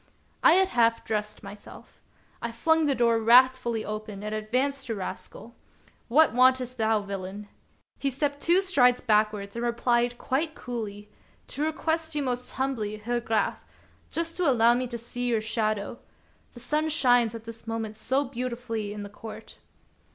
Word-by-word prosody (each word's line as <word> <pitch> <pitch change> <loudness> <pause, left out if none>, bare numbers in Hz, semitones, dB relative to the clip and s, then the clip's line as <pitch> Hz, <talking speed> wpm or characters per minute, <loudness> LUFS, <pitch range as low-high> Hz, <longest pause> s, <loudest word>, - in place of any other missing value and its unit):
I - - +7
had 380 +1 +4
half 230 -1 +2
dressed 210 -1 -3
myself. 200 +1 -12 0.4
I 235 - -3
flung 320 +7 +2
the 280 - +2
door 235 -2 +3
wrathfully 240 0 +4
open 215 -1 -6
and 210 0 -4
advanced 255 +6 -1
to 225 - -2
Rascal: 205 +4 -7 0.3
" - - -30
What 295 +2 +4
wantest 255 0 +3
thou, 220 -1 +2
villain 200 +1 -6
} - - -38
" - - -44
He 275 - 0
stepped 285 +2 -2
two 350 +3 +4
strides 250 -10 +4
backwards 210 -2 +1
and 235 - -3
replied 240 0 +1
quite 310 +7 -1
coolly: 210 -4 -6 0.4
"To 285 - -4
request 320 0 -2
you 295 - 0
most 250 -1 -3
humbly, 235 -6 -2
Herr 240 +3 -2
Graf, 225 -3 -1 0.5
just 330 0 -2
to 355 -5 +2
allow 235 -2 +5
me 250 +1 -1
to 235 -1 -5
see 245 +1 -4
your 230 -2 +2
shadow; 215 0 -2 0.5
the 240 - -11
sun 300 +6 0
shines 245 -6 +3
at 225 - -8
this 230 0 -9
moment 225 -1 -4
so 265 +6 0
beautifully 235 -4 -4
in 210 -1 -6
the - - -6
court." 215 +1 -11
235 Hz, 170 wpm, -27 LUFS, 215-260 Hz, 0.5 s, I